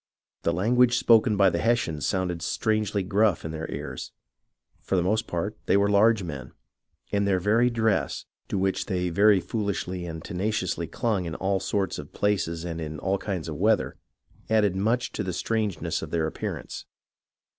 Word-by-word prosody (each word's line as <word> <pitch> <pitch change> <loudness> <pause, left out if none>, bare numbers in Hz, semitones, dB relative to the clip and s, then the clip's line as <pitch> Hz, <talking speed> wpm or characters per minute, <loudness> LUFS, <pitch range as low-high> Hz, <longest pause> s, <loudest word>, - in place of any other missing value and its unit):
The - - +1
language 120 +7 +3
spoken 115 -3 +4
by 95 -2 +5
the - - -1
Hessians 110 -10 0
sounded 90 -3 -1
strangely 105 -1 0
gruff 100 -1 +2
in 80 - -3
their 80 0 -5
ears. - - -6 0.7
For - - -1
the 90 - +2
most 110 +5 0
part, 95 +5 -2
they - - +4
were 100 0 +3
large 105 0 +4
men, 70 -6 -7 0.6
and 100 0 +1
their 95 -2 +2
very 110 +6 +3
dress, 110 -3 0 0.2
to - - -2
which 95 0 0
they 90 -1 -1
very 100 +3 +5
foolishly 95 -2 -3
and 80 -1 -6
tenaciously 105 +5 -2
clung 105 -6 -1
in 85 - -4
all 95 0 0
sorts 95 0 -1
of - - -10
places 85 -5 0
and 85 -1 -4
in 75 -1 -5
all 95 +5 -1
kinds 95 -6 -4
of 75 -2 -5
weather, - - +2 0.5
added 105 -4 +3
much 115 +6 0
to - - -4
the 90 -1 -3
strangeness 105 -3 -1
of - - -6
their 80 -2 0
appear 80 - -3
ance. - - -8
100 Hz, 175 wpm, -26 LUFS, 85-110 Hz, 0.7 s, by